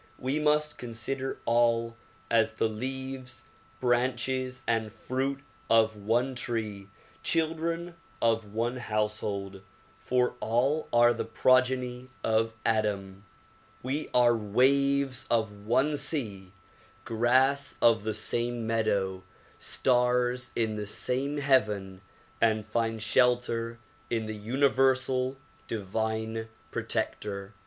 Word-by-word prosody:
We 135 +4 -1
must 150 0 +1
consider 125 +3 -3
all 115 0 +2 0.4
as 110 -1 +3
the 110 - +1
leaves, 130 +2 -5 0.4
branches 130 +1 0
and 115 -2 0
fruit 135 +4 -3 0.3
of 110 -1 +4
one 115 +6 0
tree, 110 -5 -3 0.3
children 165 +1 0 0.3
of 115 -2 +1
one 120 +3 -1
house 105 -2 -1
hold; 100 -2 -4 0.4
for 125 0 0
all 135 +7 +1
are 120 0 +5
the 115 - -3
progeny 130 -1 +2
of 110 0 +1
Adam. 100 -3 -1 0.6
We 140 +5 -2
are 120 -1 +5
waves 130 +4 +2
of 105 -3 -1
one 135 +6 +2
sea, 110 - -3 0.5
grass 130 +4 +2
of 115 -3 +4
the 110 -1 -2
same 120 +1 -1
meadow, 100 -4 0 0.4
stars 125 -1 +1
in 110 -2 0
the 105 -1 -4
same 135 +7 -1
heaven 105 -9 +1 0.4
and 110 -2 +2
find 115 0 -1
shelter 115 0 +1 0.3
in 115 -1 -1
the 110 - -4
universal 130 +2 +1 0.3
divine 110 +2 -2 0.2
protector. 100 0 -2
120 Hz, 105 wpm, -29 LUFS, 110-130 Hz, 0.6 s, are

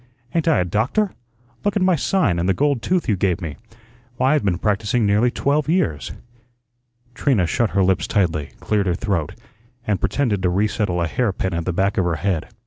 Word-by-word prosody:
Ain't 165 -1 0
I 160 - +4
a - - 0
doctor? 120 - 0 0.5
Look 205 - 0
at 205 - +1
my 185 -1 +4
sign, 145 - +1
and 90 +2 0
the 95 - +2
gold 140 -4 +1
tooth 180 -1 0
you 105 - +2
gave 90 -2 0
me. 80 -6 -6 0.6
Why, 130 +3 +2
I've 150 - +1
been 95 -4 +1
practising 105 +4 0
nearly 105 +4 +3
twelve 145 +4 0
years." 75 - 0 1.0
Trina 115 -7 +1
shut 110 +6 0
her 95 - +5
lips 95 0 +1
tightly, 80 -8 0
cleared 105 -2 0
her 90 - +1
throat, 85 -6 -2 0.5
and 100 -3 0
pretended 115 -9 0
to 90 - +2
resettle 100 -2 0
a - - 0
hair 120 +6 0
pin 95 -1 -3
at 85 -1 -2
the 90 - 0
back 95 +3 0
of 95 - +1
her 85 -2 0
head. 90 -2 -1
100 Hz, 205 wpm, -21 LUFS, 90-130 Hz, 1.0 s, her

